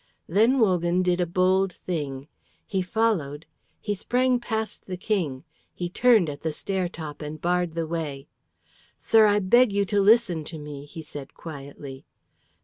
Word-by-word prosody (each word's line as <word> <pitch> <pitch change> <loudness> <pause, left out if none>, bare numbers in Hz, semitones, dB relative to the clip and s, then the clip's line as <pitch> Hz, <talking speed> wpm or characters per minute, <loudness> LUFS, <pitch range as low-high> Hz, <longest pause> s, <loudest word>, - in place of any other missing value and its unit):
Then 225 +9 +3
Wogan 180 -5 +2
did 180 0 +1
a 175 - 0
bold 185 +2 +2
thing. 145 -6 -5 0.4
He 190 -2 -1
followed, 180 -8 0 0.3
he 205 - -2
sprang 250 +5 +1
past 220 -2 -4
the 185 -1 -4
King, 175 -10 -2 0.3
he 175 -1 -3
turned 230 -5 +4
at 145 -1 -6
the 160 - -1
stair 185 +3 -2
top 155 -4 -8
and 150 +1 -6
barred 175 0 0
the 165 -1 -1
way. 155 -4 -4 0.7
"Sir, 220 -1 +5
I 205 0 +3
beg 225 +4 +4
you 200 0 +1
to 205 +1 +1
listen 200 -6 +4
to 160 - -7
me," 150 -1 -8
he 160 +2 -9
said 145 -2 -9
quietly. 140 -3 -9
180 Hz, 160 wpm, -25 LUFS, 155-205 Hz, 0.7 s, Sir